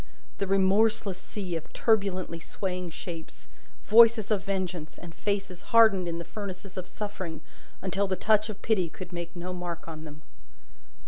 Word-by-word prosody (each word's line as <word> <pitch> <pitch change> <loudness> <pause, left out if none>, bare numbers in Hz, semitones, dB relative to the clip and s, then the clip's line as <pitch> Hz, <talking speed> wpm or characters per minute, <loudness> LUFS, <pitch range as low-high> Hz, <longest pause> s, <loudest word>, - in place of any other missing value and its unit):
The 200 - 0
remorseless 195 0 +3
sea 190 -3 -4
of 165 - -6
turbulently 195 -6 +1
swaying 180 +1 -4
shapes, 165 -1 -8 0.4
voices 225 -1 +7
of 200 -3 +2
vengeance, 185 -5 -3
and 170 -1 -10
faces 195 -2 -2
hardened 220 -6 +5
in 170 0 -2
the 170 - -5
furnaces 190 +1 -7
of 185 -1 -5
suffering 185 -7 -5 0.4
until 195 +1 0
the 190 - 0
touch 215 +2 +3
of 210 - -7
pity 190 -7 +2
could 180 +2 -9
make 170 0 -5
no 180 +1 -4
mark 175 -2 -5
on 155 -1 -7
them. 155 0 -11
185 Hz, 155 wpm, -28 LUFS, 175-205 Hz, 0.4 s, voices